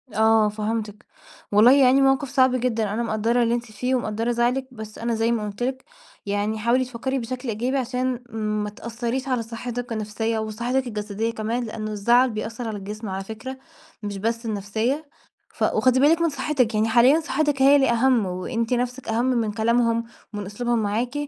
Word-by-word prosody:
آه 220 -1 +4
فهمتِك، 215 0 -4 0.5
والله 215 +5 +7
يعني 270 -1 +5
موقِف 270 0 +2
صعب 260 -1 +3
جدًا، 225 -4 0
أنا 235 +2 -1
مقدَّرة 230 +2 +1
اللي 230 +1 +1
أنتِ 235 - -3
فيه 250 +5 -1
ومقدَّرة 230 0 -1
زعلِك، 245 +3 0
بس 220 -3 -9
أنا 230 0 -1
زي 225 +1 +1
ما 220 -3 -1
قُلت 200 +4 -6
لِك 260 +1 -2 0.4
يعني 205 +2 -1
حاولي 240 +4 +2
تفكّري 260 +2 -3
بشكل 250 +1 -5
إيجابي 245 +5 -1
عشان 255 0 -2 0.4
ما 210 - -3
تأثّريش 235 +5 -4
على 255 -3 0
صحّتِك 240 +1 -6
النفسية 220 +1 -2
وصحّتِك 235 +4 -2
الجسدية 210 +1 -3
كمان، 230 +3 -2
لأنه 215 -1 -5
الزعَل 235 +5 +3
بيأثّر 225 +2 -5
على 215 -2 -4
الجسم 210 +2 -6
على 190 +1 -4
فكرة 220 +6 -7 0.5
مش 205 -1 -4
بس 230 +4 -2
النفسية، 225 +8 -2 0.4
ف - - -3
وخُدي 255 0 +3
بالِك 320 +4 +4
من 335 - +3
صحّتِك، 265 -5 0
يعني 215 +1 +2
حاليًا 250 +7 +5
صحّتِك 295 -3 0
هي 275 +1 +7
اللي 270 -3 +4
أهَم 235 -2 +3
وأنتِ 225 +6 -2
نفْسِك 250 +1 -2
أهَم 225 +2 +1
من 235 -4 +1
كلامهم 230 +1 +1 0.3
ومن 205 -1 -4
أسلوبهم 235 +4 -1
معاكِ 230 +5 -1
235 Hz, 180 wpm, -23 LUFS, 215-255 Hz, 0.5 s, والله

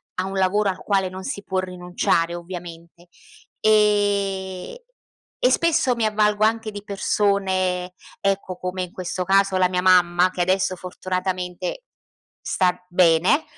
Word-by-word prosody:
a 185 - -2
un 195 - -5
lavoro 195 +2 +2
al 185 - -4
quale 195 -2 0
non 185 +1 -8
si 200 - -5
può 190 -1 -2
rinunciare, 180 -2 -1
ovviamente. 175 0 -10 0.6
Ehm, 200 - +1 0.6
e - - +3
spesso 330 -6 +2
mi 230 -2 0
avvalgo 210 0 +2
anche 220 0 0
di 205 -1 -8
persone, 190 -3 0 0.3
ecco, 195 -2 -1
come 185 +1 -4
in 180 - -8
questo 185 0 -4
caso 195 0 +3
la 185 -1 +3
mia 180 0 0
mamma 180 -1 +4
che 180 - -3
adesso 185 +1 +1
fortunatamente 185 - -4 0.6
sta 180 -1 0
bene. 180 - +3
185 Hz, 135 wpm, -22 LUFS, 180-200 Hz, 0.6 s, mamma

